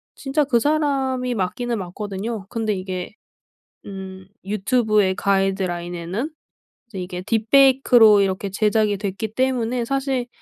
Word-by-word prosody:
진짜 285 +2 0
그 260 -4 +2
사람이 270 -3 0
맞기는 235 +4 -2
맞거든요. 200 +3 -5
근데 225 -2 -1
이게 185 -1 -5 0.7
음 190 -1 -9 0.2
유튜브의 210 -1 +1
가이드라인에는 190 - -1 0.6
이제 210 -5 -8
이게 180 0 -5
딥페이크로 230 0 +5
이렇게 195 0 -1
제작이 210 +1 +1
됐기 205 +2 -4
때문에 250 -2 0
사실 270 -1 -1
215 Hz, 295 characters per minute, -22 LUFS, 190-250 Hz, 0.7 s, 딥페이크로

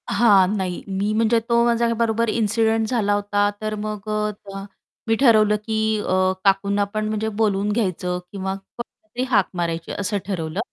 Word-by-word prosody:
हां. 200 -4 +4
नाही 185 -2 -3
मी 200 +2 -1
म्हणजे 225 +1 +3
तो 235 0 +4
माझ्याबरोबर 230 -1 +1
इन्सिडेंट 220 0 +1
झाला 215 -4 +1
होता, 205 0 +1
तर 215 0 -2
मग 210 0 -5
अ, 210 0 0
त्या 195 -1 -9 0.4
मी 225 - +3
ठरवलं, 215 -5 +5
की 220 -1 0 0.4
काकूंना 200 +1 +2
अ, - - +2
पण 215 0 -1
म्हणजे 215 0 -1
बोलून 205 -1 +1
घ्यायचं 180 -4 -1
किंवा 190 -1 -3
कोणाला 215 +3 -12
तरी 250 - 0
हाक 205 -7 +3
मारायची 165 -2 -3
असं 205 +1 -2
ठरवलं. 175 -3 -3
210 Hz, 160 wpm, -22 LUFS, 195-220 Hz, 0.4 s, ठरवलं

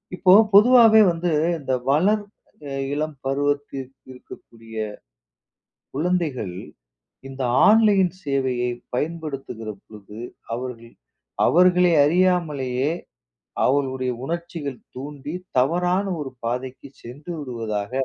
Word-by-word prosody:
இப்போ 185 0 +5 0.2
பொதுவாவே 225 0 +7
வந்து 170 0 -2 0.3
இந்த 135 -2 -3 0.2
வளர் 200 +9 +3 0.7
இளம் 155 0 -3
பருவத்தில் 140 -1 -2 0.2
இருக்கக்கூடிய 115 -3 -14 1.2
குழந்தைகள், 150 - -1 0.7
இந்த 135 0 -6 0.3
ஆன்லைன் 205 -5 +4
சேவையை 130 -3 -1 0.2
பயன்படுத்துகிற 140 -6 -4
பொழுது, 105 0 -13 0.4
அவர்கள் 115 -1 -7 0.5
அவர்களை 180 +1 +4
அறியாமலேயே 150 -6 +1 0.8
அவர்களுடைய 130 -2 0
உணர்ச்சிகள் 165 -4 -5 0.2
தூண்டி 145 +2 -7 0.2
தவறான 175 +8 +2 0.2
ஒரு 135 -3 -6
பாதைக்குச் 130 +3 -5
சென்று 145 +8 -9
விடுவதாக, 115 -6 -4
145 Hz, 85 wpm, -23 LUFS, 125-175 Hz, 1.2 s, பொதுவாவே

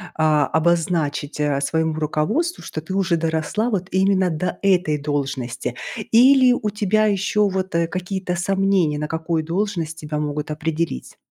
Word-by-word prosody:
а, 155 -2 +3
обозначить, 160 -3 0
а, 145 -2 +1
своему 160 +2 0
руководству, 155 - -1
что - - -5
ты 185 +4 -7
уже 185 -3 +1
доросла 160 +7 -1
вот 185 -3 -1
именно 190 0 +2
до 175 +2 -3
этой 180 -6 +2
должности? 135 -4 -3 0.4
Или 255 +2 +6
у 215 -3 -1
тебя 210 +1 +1
ещё 205 0 +2
вот, 190 -1 -3
э, 170 0 +2
какие-то 185 0 -3
сомнения 185 -4 +1
на 150 - -2
какую 160 0 -2
должность 170 -2 -2
тебя 150 0 -4
могут 150 0 -3
определить? 155 - -3
170 Hz, 150 wpm, -21 LUFS, 155-195 Hz, 0.4 s, Или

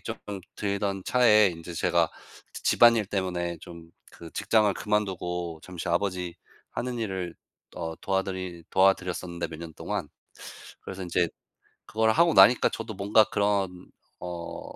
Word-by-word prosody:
쪼끔 100 -2 -6 0.2
들던 100 -1 -2
차에 110 -5 +5
인제 85 0 -8
제가 85 -1 +2 0.4
지 - - -9
집안일 115 -3 +5
때문에 90 -3 -2
좀 85 -1 -12 0.2
그 85 - -11
직장을 105 -4 +2
그만두고 90 -5 -2
잠시 90 -1 -6
아버지 90 -1 -1 0.4
하는 125 0 -3
일을 95 -6 -3 0.4
어 85 -2 -4
도와드리 95 -3 -3
도와드렸었는데, 90 -2 +1
몇 80 -1 -9
년 85 -1 -8
동안. 100 -8 -4 0.7
그래서 95 0 -7
인제 85 -1 +1 0.6
그걸 110 0 +2
하고 170 +4 +4
나니까 125 - +7
저도 115 -1 -6
뭔가 100 +3 +4
그런 100 -3 -1 0.3
어 85 -1 -6
95 Hz, 285 characters per minute, -27 LUFS, 85-105 Hz, 0.7 s, 나니까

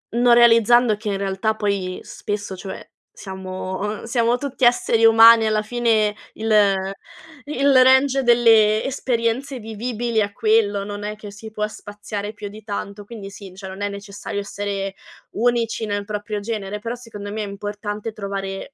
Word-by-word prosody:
non 240 0 +5
realizzando 235 -1 +5
che 215 0 -8
in 195 - -1
realtà 195 +2 -1
poi 200 -3 -2
spesso, 205 -2 -5
cioè, 190 0 -8 0.3
siamo 185 -1 -6
uhm, 210 +1 -4
siamo 235 0 +1
tutti 275 -1 -1
esseri 230 -1 +3
umani 225 0 +8
alla 215 0 +1
fine, 220 -2 +1 0.2
il 220 0 -3 0.9
il 280 -1 +2
range 265 +1 +4
delle 225 -3 +5
esperienze 255 0 -1
vivibili 225 +1 -4
è 205 -1 0
quello, 210 -2 +2
non 205 0 -6
è 210 0 -4
che 210 -1 -10
si 220 +2 -10
può 210 0 -2
spaziare 205 0 -7
più 205 -1 -7
di 215 +1 -12
tanto, 200 -1 -6
quindi 210 -3 -9
sì, 195 -1 -11
cioè, 190 -1 -8
non 190 +2 -9
è 205 - 0
necessario 200 0 -6
essere 200 -1 -4 0.4
unici 230 -1 0
nel 205 -1 -2
proprio 210 0 -4
genere, 210 -2 -4
però 230 +3 -4
secondo 205 -4 -9
me 215 0 -3
è - - -5
importante 205 +2 -5
trovare 195 +3 -5
215 Hz, 160 wpm, -21 LUFS, 205-230 Hz, 0.9 s, umani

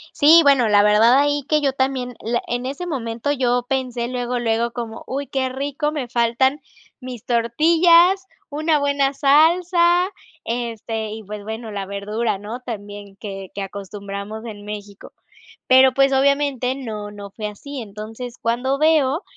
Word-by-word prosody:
Sí, 320 +3 +7
bueno, 275 -5 +4
la 205 -1 +5
verdad 215 +4 +5
ahí 290 0 +1
que 305 0 +2
yo 275 -2 +1
también, 260 -2 -2
le 235 +2 0
en 245 +1 -3
ese 280 +7 -4
momento, 235 -3 -3
yo 245 -3 +1
pensé 255 -3 -2
luego, 245 0 -2
luego 235 0 0
como: 230 -2 -6
"Uy 275 +2 -4
qué 265 -1 -1
rico, 285 +3 -2
me 290 -5 -4
faltan 245 +4 +1 0.4
mis 250 -4 -9
tortillas, 335 +10 +4 0.2
una 305 +1 +1
buena 280 -1 +1
salsa, 345 +5 +3 0.4
este, 225 -2 -4
y 220 +1 -7
pues 210 +1 -8
bueno, 220 +1 -6
la 200 -1 -4
verdura", 205 +3 -2
¿no? 215 +4 -7
También, 205 -4 -8
que 195 -3 -8
que 200 - -5
acostumbramos 200 +2 -7
en 205 -3 -9
México. 205 -1 -9 0.5
Pero, 260 0 +6
pues, 275 0 +3
obviamente 275 -2 +1
no 215 -6 -6
no 200 -1 -10
fue 210 0 -5
así. 265 +6 -8
Entonces, 220 +4 -8
cuando 245 +4 -1
veo, 310 +1 +2
245 Hz, 155 wpm, -21 LUFS, 220-280 Hz, 0.5 s, Sí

